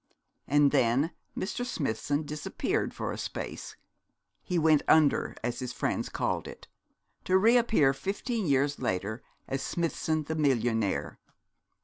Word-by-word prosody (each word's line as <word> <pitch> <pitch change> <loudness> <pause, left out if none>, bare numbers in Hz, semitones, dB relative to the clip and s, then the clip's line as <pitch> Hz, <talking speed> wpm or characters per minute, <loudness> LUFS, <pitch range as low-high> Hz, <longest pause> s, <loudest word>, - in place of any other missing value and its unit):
And 145 -1 +4
then 135 +4 +2 0.3
Mr. 210 +5 -2
Smithson 145 - -1
disappeared 150 0 -2
for - - -4
a - - -5
space - - -6 0.7
he 180 - -2
went 155 -2 +4
under, 155 -3 +4
as 120 0 -2
his 125 -1 -4
friends - - -2
called - - -2
it; - - -11 0.6
to 185 - +4
re 225 +5 +5
appear 220 - +4
fifteen 205 - -3
years 140 0 +2
later 100 +6 -2 0.3
as 135 0 -2
Smithson 160 -1 -1
the 160 - -4
millionaire. 120 -9 0
145 Hz, 130 wpm, -29 LUFS, 130-170 Hz, 0.7 s, re